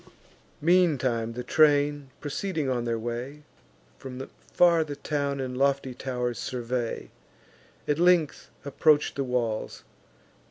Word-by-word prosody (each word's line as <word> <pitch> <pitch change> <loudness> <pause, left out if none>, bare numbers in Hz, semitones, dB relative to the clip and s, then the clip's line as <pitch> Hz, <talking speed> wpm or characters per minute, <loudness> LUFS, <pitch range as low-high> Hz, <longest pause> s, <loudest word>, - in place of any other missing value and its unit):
Meantime 135 -10 +2
the 125 +1 -5
train, 145 0 +3
proceeding 155 0 -2
on 125 -2 -1
their 115 -1 -1
way, 120 +6 -5 0.6
From 130 -1 -7 0.2
far 170 -2 +5
the 145 -2 -6
town 140 -1 -2
and 130 -1 -4
lofty 135 -1 +1
tow'rs 125 -3 -3
survey; 120 +1 -3 0.8
At 150 +1 +1
length 175 -3 +2 0.2
approach 145 +1 +3
the 140 - -2
walls. 120 -4 -2
135 Hz, 115 wpm, -27 LUFS, 125-150 Hz, 0.8 s, far